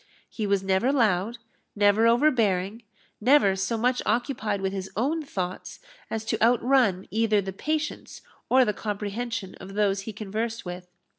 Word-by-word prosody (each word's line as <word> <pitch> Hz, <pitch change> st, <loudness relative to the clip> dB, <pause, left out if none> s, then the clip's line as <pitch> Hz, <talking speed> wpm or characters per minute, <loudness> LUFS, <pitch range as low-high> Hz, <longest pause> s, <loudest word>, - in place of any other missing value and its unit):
He 215 Hz, -3 st, -3 dB
was 200 Hz, -1 st, +1 dB
never 190 Hz, +7 st, +2 dB
loud, 225 Hz, -4 st, +1 dB, 0.4 s
never 205 Hz, +2 st, +4 dB
overbearing, 230 Hz, -6 st, +2 dB, 0.4 s
never 245 Hz, -5 st, +5 dB
so 195 Hz, +4 st, -1 dB
much 250 Hz, +2 st, +1 dB
occupied 220 Hz, -2 st, -1 dB
with 190 Hz, 0 st, -2 dB
his 190 Hz, -1 st, -4 dB
own 295 Hz, +8 st, 0 dB
thoughts 185 Hz, -10 st, -5 dB, 0.3 s
as 220 Hz, 0 st, -3 dB
to -, -, -2 dB
outrun 235 Hz, -4 st, +3 dB
either 220 Hz, -1 st, +2 dB
the 190 Hz, -1 st, -4 dB
patience 305 Hz, +8 st, -4 dB, 0.3 s
or 260 Hz, 0 st, +5 dB
the 210 Hz, -, 0 dB
comprehension 210 Hz, 0 st, -4 dB
of 195 Hz, +1 st, -9 dB
those 200 Hz, -2 st, +1 dB
he 220 Hz, -, -6 dB
conversed 220 Hz, +2 st, -4 dB
with. 180 Hz, 0 st, -7 dB
215 Hz, 150 wpm, -26 LUFS, 195-240 Hz, 0.4 s, never